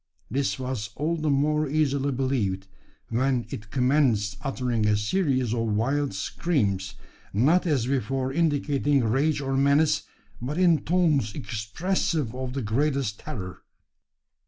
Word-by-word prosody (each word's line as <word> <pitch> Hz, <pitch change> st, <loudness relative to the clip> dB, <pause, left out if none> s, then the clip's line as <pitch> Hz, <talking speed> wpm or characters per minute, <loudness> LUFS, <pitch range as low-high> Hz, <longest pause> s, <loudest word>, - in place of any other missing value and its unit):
This 135 Hz, +3 st, 0 dB
was 125 Hz, -5 st, -4 dB
all 155 Hz, +4 st, 0 dB
the 155 Hz, -2 st, -1 dB
more 150 Hz, +1 st, +2 dB
easily 140 Hz, -2 st, +1 dB
believed, 120 Hz, -8 st, -1 dB, 0.4 s
when 125 Hz, +1 st, +1 dB
it 105 Hz, -1 st, -7 dB
commenced 125 Hz, -5 st, +2 dB
uttering 125 Hz, -5 st, -1 dB
a 105 Hz, 0 st, +3 dB
series 130 Hz, -, 0 dB
of 120 Hz, -, -1 dB
wild 125 Hz, +4 st, 0 dB
screams; 100 Hz, -, -1 dB, 0.4 s
not 155 Hz, -, +3 dB
as 140 Hz, -7 st, +1 dB
before 130 Hz, 0 st, -1 dB
indicating 145 Hz, -3 st, +1 dB
rage 140 Hz, +7 st, +1 dB
or 135 Hz, -1 st, -1 dB
menace, 145 Hz, +3 st, +3 dB, 0.4 s
but 140 Hz, +6 st, -3 dB
in 175 Hz, -4 st, +4 dB
tones 150 Hz, -, +2 dB
expressive 140 Hz, -, -2 dB
of 130 Hz, 0 st, -4 dB
the 135 Hz, -2 st, -3 dB
greatest 130 Hz, -1 st, 0 dB
terror! 95 Hz, -5 st, -7 dB
135 Hz, 130 wpm, -26 LUFS, 115-150 Hz, 0.4 s, in